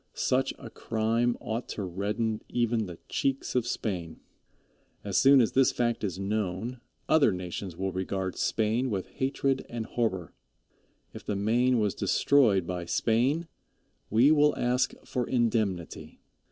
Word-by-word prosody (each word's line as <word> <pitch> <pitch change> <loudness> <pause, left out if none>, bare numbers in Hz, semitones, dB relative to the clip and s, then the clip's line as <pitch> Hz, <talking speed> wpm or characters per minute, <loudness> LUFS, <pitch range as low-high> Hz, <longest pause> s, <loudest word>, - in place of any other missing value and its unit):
Such 130 +1 +1
a - - -10
crime 115 +2 0
ought 115 +3 -4
to 105 - -2
redden 105 +4 -2
even 120 -3 0
the 85 -2 -8
cheeks 135 0 -1
of 125 -2 0
Spain. 90 -9 -3 0.8
As 100 -2 -4
soon 135 0 +7
as 115 - +3
this 135 0 +4
fact 120 -2 -1
is 95 -4 -2
known, 105 +4 -3 0.3
other 150 -8 +5
nations 90 -1 -5
will 95 0 -2
regard 95 0 -3
Spain 115 +4 0
with 95 -4 -2
hatred 135 0 -1
and 115 -2 -4
horror. 95 -10 -2 0.8
If - - -9
the 105 - -2
Maine 120 +5 +2
was 105 -3 +1
destroyed 110 -11 +3
by 90 0 -4
Spain 125 - +1 0.6
we 120 +7 +5
will 150 -1 +4
ask 125 +1 +1
for 125 -2 -2
indemnity. 110 -8 -1
110 Hz, 140 wpm, -28 LUFS, 95-125 Hz, 0.8 s, soon